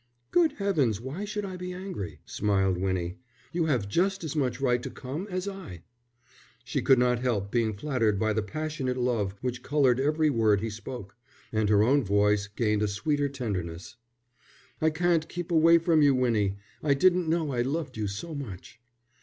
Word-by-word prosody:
"Good 335 -4 +4
heavens, 155 - +1
why 140 - -5
should 210 0 -3
I 185 -2 -6
be 180 0 -5
angry?" 180 - -6
smiled 95 -3 +1
Winnie. 95 +1 -2 0.3
"You 170 -1 +1
have 125 -9 +1
just 190 - 0
as 160 -1 -4
much 130 -4 0
right 125 -3 +2
to - - -5
come 145 +9 -6
as 185 +1 -3
I." 190 - -7 0.8
She - - -2
could 135 - +5
not 125 0 +2
help 110 -6 -1
being 115 -3 +1
flattered 115 -4 0
by 110 +2 +1
the 110 - 0
passionate 135 +3 -3
love 115 -6 0
which 125 -1 -3
coloured 135 -4 +2
every 150 +2 +2
word 110 -5 +3
he 110 +2 -3
spoke, 110 -1 -8 0.4
and 110 -1 +1
her 105 -1 +5
own 135 +4 +3
voice 100 0 +2
gained 105 0 0
a 105 - +2
sweeter 145 +8 0
tenderness. 95 -9 -5 0.9
"I 160 - +4
can't 165 0 +1
keep 175 0 -5
away 165 +1 +6
from 165 -1 +3
you, 140 -2 +5
Winnie. 110 -6 +1 0.2
I 145 -2 +2
didn't 180 +2 +3
know 160 -3 0
I 120 - +1
loved 140 +1 -2
you 110 -2 -2
so 105 +12 -5
much." 115 -4 -8
125 Hz, 180 wpm, -28 LUFS, 105-160 Hz, 0.9 s, away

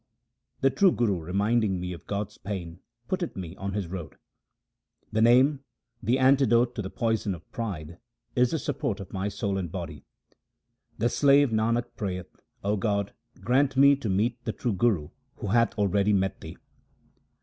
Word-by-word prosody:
The 135 0 +4
true 195 +3 +4
Guru 105 - +1
reminding 100 +3 +1
me 90 0 -4
of 85 - -12
God's 105 +1 -4
name 90 -4 -5 0.3
putteth 185 -3 -2
me 90 -2 -6
on 95 0 -4
His 100 -2 -2
road. 85 -4 -7 1.0
The 110 - +1
Name, 130 +5 +5 0.4
the 120 +3 +2
antidote 130 -3 +4
to 110 - -4
the 95 - -5
poison 110 -4 -1
of 85 - -15
pride, 85 -7 -5 0.4
is 125 0 +4
the 160 - -1
support 140 -8 -2
of 95 - -9
my 95 +1 -1
soul 100 -1 -2
and 90 -4 -4
body. 80 -5 -6 0.9
The 115 - +2
slave 140 0 +4
Nanak 115 +2 0
prayeth, 90 -3 -5 0.3
O 105 +1 +1
God, 100 0 -1 0.3
grant 135 +2 +2
me 140 +1 +7
to 120 -6 -4
meet 115 +6 0
the 110 - -2
true 120 -1 -2
Guru 95 -7 +1 0.3
who 105 - -5
hath 115 +2 +2
already 100 0 +2
met 95 -1 0
Thee. - - -9
105 Hz, 165 wpm, -27 LUFS, 95-120 Hz, 1.0 s, me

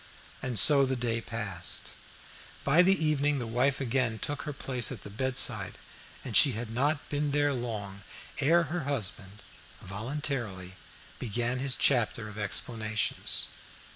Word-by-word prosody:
And 125 -3 -2
so 140 +7 +9
the 130 0 0
day 115 -2 -1
passed 105 -7 -4 0.7
by. 140 +5 +3
In 180 - +6
the 190 -4 +3
evening 145 -1 +1
the 120 - -3
wife 125 +4 0
again 125 -3 0
took 145 +5 -3
her - - -2
place 130 -4 -2
at 120 -7 -7
the 100 - -9
bedside, 130 +4 0 0.5
and - - -5
she - - +7
had 115 +1 -5
not 145 +4 0
been 145 0 -1
there 145 0 +1
long 105 -6 -5 0.4
ere 165 +5 +4
her 165 -1 -4
husband 105 -6 -4 0.4
voluntarily 110 -3 -5 0.5
began 120 +2 -2
his 135 0 +1
chapter 120 -4 +2
of 105 0 -9
explanations. 110 +1 -1
125 Hz, 145 wpm, -29 LUFS, 110-140 Hz, 0.7 s, so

